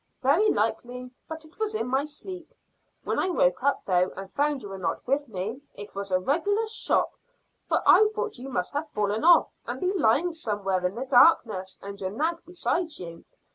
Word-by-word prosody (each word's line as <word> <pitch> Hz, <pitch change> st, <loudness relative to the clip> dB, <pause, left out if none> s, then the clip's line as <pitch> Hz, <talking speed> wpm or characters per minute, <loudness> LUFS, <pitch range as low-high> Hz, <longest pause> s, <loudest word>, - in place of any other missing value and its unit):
'" -, -, -46 dB
"Very 330 Hz, +12 st, +4 dB
likely, 245 Hz, +3 st, -2 dB, 0.2 s
but 320 Hz, 0 st, -7 dB
it 315 Hz, +6 st, -20 dB
was 435 Hz, 0 st, -1 dB
in 435 Hz, -, -1 dB
my 265 Hz, +3 st, 0 dB
sleep. 330 Hz, +3 st, -8 dB, 0.5 s
When -, -, -1 dB
I -, -, +1 dB
woke -, -, +2 dB
up, 280 Hz, -, +1 dB
though, 180 Hz, -1 st, +2 dB
and 195 Hz, 0 st, -8 dB
found 290 Hz, -3 st, 0 dB
you 205 Hz, -, -7 dB
were 195 Hz, 0 st, -7 dB
not 180 Hz, -, -3 dB
with 280 Hz, +3 st, 0 dB
me, 215 Hz, +5 st, -5 dB
it 205 Hz, +1 st, -9 dB
was 200 Hz, 0 st, -5 dB
a 185 Hz, -, +4 dB
regular 355 Hz, -, 0 dB
shock, 440 Hz, 0 st, 0 dB, 0.6 s
for -, -, +1 dB
I 430 Hz, 0 st, +7 dB
thought 430 Hz, -, -3 dB
you 265 Hz, +2 st, -7 dB
must 180 Hz, -9 st, -2 dB
have 295 Hz, +2 st, -3 dB
fallen 210 Hz, -1 st, -1 dB
off 345 Hz, +1 st, +6 dB, 0.2 s
and -, -, -4 dB
be 370 Hz, +1 st, 0 dB
lying 335 Hz, -, +2 dB
somewhere 205 Hz, -, -2 dB
in 180 Hz, -, -7 dB
the 255 Hz, +3 st, -4 dB
darkness 230 Hz, -, +4 dB
and 200 Hz, 0 st, -8 dB
your 185 Hz, -, -2 dB
nag 320 Hz, -, -2 dB
beside 355 Hz, -2 st, -2 dB
you. 170 Hz, -2 st, -9 dB
270 Hz, 205 wpm, -26 LUFS, 200-335 Hz, 0.6 s, I